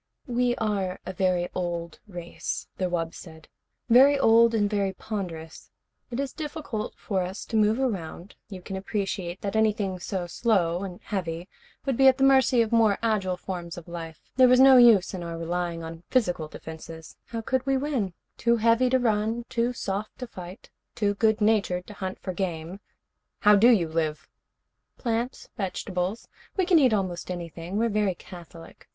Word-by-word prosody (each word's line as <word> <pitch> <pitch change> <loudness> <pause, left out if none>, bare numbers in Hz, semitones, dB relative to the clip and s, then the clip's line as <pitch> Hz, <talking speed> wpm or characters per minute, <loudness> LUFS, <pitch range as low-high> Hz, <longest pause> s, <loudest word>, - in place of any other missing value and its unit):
"We 245 -2 +1
are 200 -5 -2
a 185 - -5
very 180 -1 +1
old 170 -2 -4
race," 175 -3 -5
the 185 -1 0
wub 165 -2 -2
said. 160 -2 -12 0.4
"Very 265 +4 +7
old 230 -2 +5
and 205 -2 +2
very 200 -2 0
ponderous. 170 -8 -6 0.4
It 240 - -4
is 275 -1 -2
difficult 295 -8 -5
for 195 -3 -2
us 185 +2 -5
to - - -5
move 215 +2 +3
around. 195 -7 -3 0.2
You 185 -3 -9
can 195 - -6
appreciate 190 -2 -3
that 200 +1 -3
anything 210 -4 +1
so 185 0 -3
slow 175 -3 +1
and 185 -2 -6
heavy 175 -3 -4 0.4
would 270 -4 0
be 270 - +6
at 260 0 +6
the 270 - +1
mercy 265 -3 +5
of 220 - -5
more 225 -3 +4
agile 195 -5 0
forms 175 -2 -6
of 175 - -10
life. 165 -2 -8
There 260 -1 +7
was 250 0 +5
no 265 0 +8
use 230 -7 +6
in 185 - -4
our 170 -1 -5
relying 170 0 -3
on 165 0 -8
physical 180 -11 +1
defenses. 160 +1 -10
How 230 -1 -5
could 260 +3 -1
we 270 0 +3
win? 260 - -2 0.2
Too 235 0 +3
heavy 230 +3 +3
to 260 - +4
run, 225 0 0
too 235 0 0
soft 210 -3 -4
to 250 - -5
fight, 185 -4 -11 0.2
too 205 -2 +1
good 220 +1 +2
natured 200 -4 +2
to 210 - -10
hunt 190 -2 -5
for 185 - -5
game 175 0 -4 0.3
" - - -55
"How 210 0 +7
do 220 +4 +6
you 195 -9 +4
live?" 160 -1 -2 0.7
"Plants. 235 +1 -3
Vegetables. 190 0 -3 0.3
We 375 - +2
can 350 -3 +5
eat 260 -5 +4
almost 185 -5 -2
anything. 175 +1 -5
We're 230 +2 +2
very 205 -3 +1
catholic. 170 -2 -13
200 Hz, 180 wpm, -26 LUFS, 175-230 Hz, 0.7 s, no